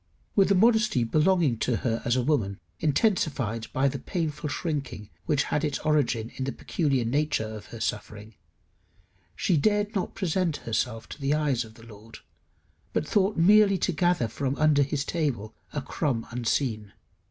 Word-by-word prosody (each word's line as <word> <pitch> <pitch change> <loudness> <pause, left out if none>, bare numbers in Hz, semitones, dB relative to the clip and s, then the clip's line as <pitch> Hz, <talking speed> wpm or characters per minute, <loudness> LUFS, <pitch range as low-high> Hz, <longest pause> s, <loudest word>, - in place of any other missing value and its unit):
With 195 -2 +4
the 200 - +4
modesty 220 - +4
belonging 155 -1 +2
to 120 - +1
her 115 -1 0
as 120 - +1
a 130 - +1
woman, 110 -9 0 0.2
intensified 140 - 0
by 135 +2 +2
the 140 0 -2
painful 155 0 -3
shrinking 140 - -4 0.2
which 150 -4 +2
had 150 - -1
its 150 -2 0
origin 140 -7 0
in 130 - -2
the 135 - -2
peculiar 135 -7 -1
nature 145 -1 0
of 110 -1 -8
her 115 - -9
suffering, 110 -1 -4 1.0
she 180 - +1
dared 205 +6 +1
not 195 -4 -2
present 180 -3 0
herself 115 0 -2
to - - -9
the 140 +2 +2
eyes 145 -5 +1
of 110 -1 -14
the 115 - -15
Lord, 110 0 -13 0.8
but 155 - -1
thought 200 -1 +1
merely 200 +3 +6
to 185 - 0
gather 175 -7 +1
from 135 +5 -2
under 150 -1 +3
his 140 0 -1
table 130 - -2 0.2
a 145 - -3
crumb 130 -7 -2
unseen. 115 -3 -1
140 Hz, 165 wpm, -27 LUFS, 115-165 Hz, 1.0 s, merely